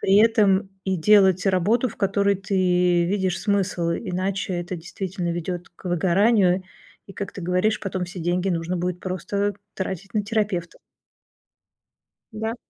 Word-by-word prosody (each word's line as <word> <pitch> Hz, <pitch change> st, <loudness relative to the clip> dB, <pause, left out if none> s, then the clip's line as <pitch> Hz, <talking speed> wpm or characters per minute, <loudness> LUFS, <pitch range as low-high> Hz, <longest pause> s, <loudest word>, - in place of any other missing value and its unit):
при 195 Hz, +1 st, +3 dB
этом 205 Hz, -3 st, +4 dB, 0.2 s
и 190 Hz, -1 st, 0 dB
делать 190 Hz, +1 st, +4 dB
работу, 205 Hz, +7 st, +2 dB
в -, -, -11 dB
которой 200 Hz, 0 st, +2 dB
ты 180 Hz, -2 st, +2 dB
видишь 190 Hz, -1 st, 0 dB
смысл, 195 Hz, -5 st, 0 dB
иначе 190 Hz, 0 st, -2 dB
это, 175 Hz, +1 st, -4 dB
действительно, 175 Hz, +1 st, -4 dB
ведет 175 Hz, +1 st, -4 dB
к 175 Hz, -, -23 dB
выгоранию 185 Hz, +2 st, +3 dB, 0.4 s
и, 195 Hz, -, -11 dB
как 200 Hz, -, -5 dB
ты -, -, -8 dB
говоришь, 185 Hz, +5 st, +1 dB
потом 185 Hz, -2 st, -3 dB
все 180 Hz, +1 st, -9 dB
деньги 175 Hz, +3 st, 0 dB
нужно 170 Hz, 0 st, -1 dB
будет 180 Hz, 0 st, -2 dB
просто 200 Hz, +3 st, -2 dB, 0.2 s
тратить 190 Hz, +1 st, -5 dB
на 210 Hz, -2 st, 0 dB
терапевта. 205 Hz, -5 st, -2 dB, 1.5 s
Да. 220 Hz, +2 st, -3 dB
190 Hz, 140 wpm, -23 LUFS, 180-200 Hz, 1.5 s, этом